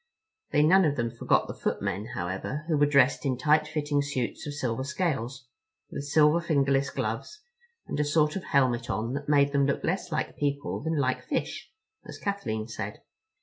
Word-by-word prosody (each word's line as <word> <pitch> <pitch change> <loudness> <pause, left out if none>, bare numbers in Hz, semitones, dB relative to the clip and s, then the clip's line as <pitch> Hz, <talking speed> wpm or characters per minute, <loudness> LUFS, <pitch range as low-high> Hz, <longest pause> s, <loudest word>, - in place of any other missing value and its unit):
They 150 - +3
none 190 +5 +6
of 145 -2 +1
them 115 -2 -1
forgot 115 - +1
the - - -5
footmen, 100 +4 -2
however, 95 +12 -4
who 160 - +2
were 145 0 +4
dressed 140 -2 +4
in 130 -3 0
tight 150 +3 +3
fitting 150 -2 0
suits 140 0 -3
of 145 - -5
silver 130 -3 -2
scales, 135 -4 -2 0.5
with 140 - -5
silver 150 +3 +4
fingerless 140 -4 +2
gloves, 115 - -4 0.4
and - - -4
a - - +3
sort 150 +1 +2
of 190 - -4
helmet 125 -3 +1
on 110 +4 -2
that 140 +1 -4
made 140 -1 +4
them 140 -1 +2
look 140 - -1
less 180 0 -1
like 155 - -2
people 145 -1 -1
than 160 +1 -1
like 130 -3 +1
fish, - - -3 0.4
as - - -8
Kathleen 110 - -3
said. 110 -2 -6
140 Hz, 185 wpm, -28 LUFS, 125-150 Hz, 0.5 s, none